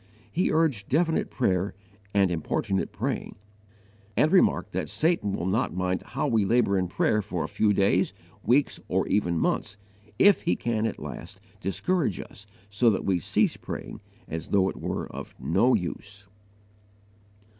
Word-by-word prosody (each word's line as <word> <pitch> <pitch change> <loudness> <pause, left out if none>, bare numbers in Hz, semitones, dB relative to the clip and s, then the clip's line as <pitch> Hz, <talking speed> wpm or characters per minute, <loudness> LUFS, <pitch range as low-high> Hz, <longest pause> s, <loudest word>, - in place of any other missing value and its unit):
He 180 - +1
urged 145 -11 +1
definite 160 +4 +1
praying 95 -5 0 0.4
and 100 -3 +3
importunate 90 +3 -1
praying, - - -3 0.8
and 155 - +4
remarked 190 - +3
that - - -3
Satan 160 - +1
will 85 - -2
not 95 0 0
mind 90 0 -1
how 135 +3 -3
we 115 -5 +2
labour 110 0 +2
in 90 - 0
prayer 105 +3 +1
for 90 -5 -3
a - - -3
few 105 +5 +2
days, 100 0 +2 0.3
weeks, 135 +4 +2
or - - 0
even 90 -5 +1
months, 100 - -1 0.4
if 200 - +6
he 175 - +1
can 115 -2 -1
at - - -4
last - - -8 0.2
discourage 135 - 0
us 100 +2 -10 0.2
so 105 +4 +3
that 100 - -1
we 95 -3 +2
cease - - +1
praying, - - -7 0.3
as 80 0 -5
though 95 -2 +3
it - - -7
were - - -2
of - - -9
no 125 +2 +3
use. 100 +3 -5
105 Hz, 155 wpm, -27 LUFS, 95-125 Hz, 0.8 s, if